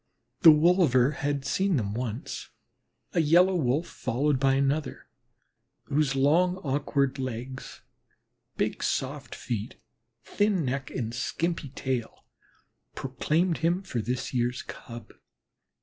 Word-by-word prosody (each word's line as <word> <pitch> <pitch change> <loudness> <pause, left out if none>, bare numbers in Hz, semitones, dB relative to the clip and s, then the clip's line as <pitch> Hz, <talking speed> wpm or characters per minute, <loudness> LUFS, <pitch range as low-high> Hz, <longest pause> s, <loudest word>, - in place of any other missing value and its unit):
The 165 - +9
wolver 150 -5 +5
had 145 -2 -2
seen 190 +5 +1
them 105 -6 -1
once 120 0 -5 0.6
a - - +2
Yellow 175 +5 +5
Wolf 150 0 +1
followed 135 +1 -1
by 135 0 +3
another, 140 +2 -1 0.8
whose 140 -1 0
long, 170 +7 +3
awkward 140 -1 0
legs, 130 0 -6 0.8
big, - - -1
soft 140 +2 -2
feet, 110 -4 -4 0.5
thin 205 -6 +1
neck, 130 +1 -2
and 115 -3 -4
skimpy 165 +4 -2
tail 130 -3 -4 0.7
proclaimed 155 +6 0
him 170 +4 +1
this 125 +3 -2
year's 125 0 0
Cub. 120 -1 -10
140 Hz, 110 wpm, -27 LUFS, 130-160 Hz, 0.8 s, The